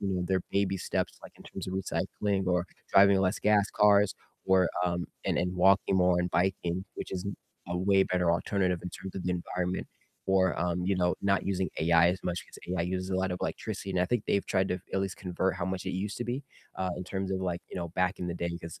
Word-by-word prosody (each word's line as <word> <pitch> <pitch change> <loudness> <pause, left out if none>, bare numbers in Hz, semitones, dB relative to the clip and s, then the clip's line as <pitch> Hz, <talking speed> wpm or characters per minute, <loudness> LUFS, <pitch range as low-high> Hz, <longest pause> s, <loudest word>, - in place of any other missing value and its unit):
you 100 - -1
know, 90 -1 0
their 95 0 +1
baby 100 -1 +1
steps, - - -2
like - - -11
in - - -14
terms - - -7
of 95 - -4
recycling 95 0 -1
or 90 -1 +2 0.3
driving 100 0 +7
less 95 +1 +1
gas 105 -1 +4
cars 105 -1 +5 0.3
or, 95 -2 +4 0.2
um 85 0 -1 0.2
and - - +1
and 90 +1 0
walking 95 +1 +4
more 90 -1 +4
and 90 0 -1
biking, 90 0 0
which - - -6
is 95 +1 -3 0.4
a 90 - -1
way 95 +1 +4
better 90 -2 +1
alternative 90 0 +1
in 90 - -4
terms 95 -1 -8
of 95 - -3
the 90 - 0
environment 90 +1 -2 0.4
or, 95 -2 +3
um, 90 0 0
you 100 - +2
know, 90 -1 +2
not 100 0 +2
using 95 -1 0
AI 85 +1 +5
as 95 - -4
much 90 -1 -2
'cause - - -13
AI 90 -1 0
uses 95 +2 -2
a 95 - +1
lot 95 -1 0
of 90 - -3
electricity, 100 - -4
and 95 - 0
I - - +4
think 120 -1 0
they've 100 - +1
tried 95 0 +1
to 90 -1 -2
at 95 - +2
least 95 -1 -2
convert 95 0 -1
how 90 - -2
much 95 0 -3
it - - 0
used 100 +3 -3
to 120 - -2
be, 130 +4 -3 0.3
uh, 95 -1 -1
in - - -4
terms 95 +1 -3
of 95 - -1
like, 90 -2 -2
you - - -10
know, 85 -1 -3
back 90 +3 0
in 90 - -2
the 85 - -2
day 85 0 -2
'cause 85 -1 -9
95 Hz, 245 wpm, -30 LUFS, 90-95 Hz, 0.4 s, driving